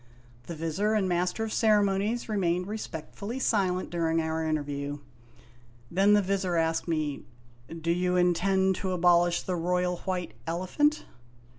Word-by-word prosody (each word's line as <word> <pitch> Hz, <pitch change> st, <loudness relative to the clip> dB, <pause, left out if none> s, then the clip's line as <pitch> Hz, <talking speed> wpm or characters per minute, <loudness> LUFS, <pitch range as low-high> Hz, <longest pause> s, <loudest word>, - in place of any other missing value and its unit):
The 170 Hz, -, -5 dB
Vizir 165 Hz, +7 st, -1 dB
and 200 Hz, -3 st, +1 dB
Master 180 Hz, +4 st, 0 dB
of 220 Hz, -, -3 dB
Ceremonies 210 Hz, +1 st, +2 dB
remained 180 Hz, -4 st, 0 dB
respectfully 210 Hz, +2 st, -6 dB
silent 190 Hz, -7 st, 0 dB
during 165 Hz, -1 st, +1 dB
our 160 Hz, 0 st, -1 dB
interview. 145 Hz, -2 st, -2 dB, 0.9 s
Then 195 Hz, +4 st, +4 dB
the 205 Hz, -1 st, +4 dB
Vizir 190 Hz, -2 st, -1 dB
asked 165 Hz, 0 st, 0 dB
me: 155 Hz, -4 st, -1 dB, 0.5 s
"Do 165 Hz, 0 st, -2 dB
you 180 Hz, +1 st, +1 dB
intend 190 Hz, +2 st, +2 dB
to 190 Hz, -1 st, -2 dB
abolish 175 Hz, -1 st, +3 dB
the 185 Hz, -, -2 dB
Royal 180 Hz, +1 st, 0 dB
White 180 Hz, -1 st, -4 dB
Elephant 185 Hz, -, 0 dB
180 Hz, 135 wpm, -28 LUFS, 165-195 Hz, 0.9 s, Then